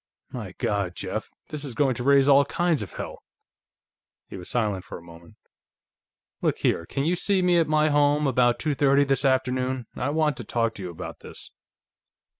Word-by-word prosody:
"My - - -6
God, 100 -3 -1
Jeff! - - -4 0.2
This 150 -1 -5
is 135 -5 -6
going 135 +1 +2
to 120 - -5
raise 140 0 +5
all 140 0 +7
kinds 170 -5 0
of 100 - -7
hell!" - - -7 1.0
He - - -10
was 90 -2 -6
silent 105 -6 -1
for - - -8
a - - -14
moment. 85 0 -15 1.1
"Look - - +1
here, 85 - 0
can 135 - -2
you 170 +4 +1
see 190 +1 +1
me, 175 -1 +4
at 165 - +2
my 155 0 +3
home, 145 0 +3
about 125 -2 +3
two 150 -1 -1
thirty 140 0 +4
this 135 -1 0
afternoon? 130 -1 0
I 130 - -2
want 150 -2 +1
to - - -6
talk 115 +1 -1
to 100 - -9
you 90 - -5
about 85 - -8
this." - - -8
135 Hz, 195 wpm, -25 LUFS, 115-150 Hz, 1.1 s, all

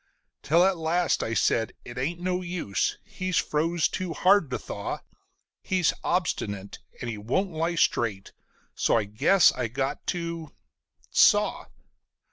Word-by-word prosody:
Till 165 +5 +4
at 190 -2 +2
last 165 +2 +1
I 115 - -2
said: 115 -1 +1
"It 120 +1 -7
ain't 165 +7 -2
no 180 0 -1
use 175 - -2
he's 185 -2 -3
froze 160 +2 +1
too 185 -3 -4
hard 185 -1 +4
to - - -2
thaw; - - -5 0.6
He's 185 -4 +1
obstinate, 100 - -2 0.2
and 120 - -4
he 110 -3 -4
won't 180 - -1
lie 165 +2 -1
straight, 110 -10 0 0.4
so - - +2
I 110 - +1
guess 130 - +4
I - - -2
got 135 +4 -3
to 170 -3 -4 0.6
saw." - - +4
160 Hz, 140 wpm, -26 LUFS, 120-180 Hz, 0.6 s, Till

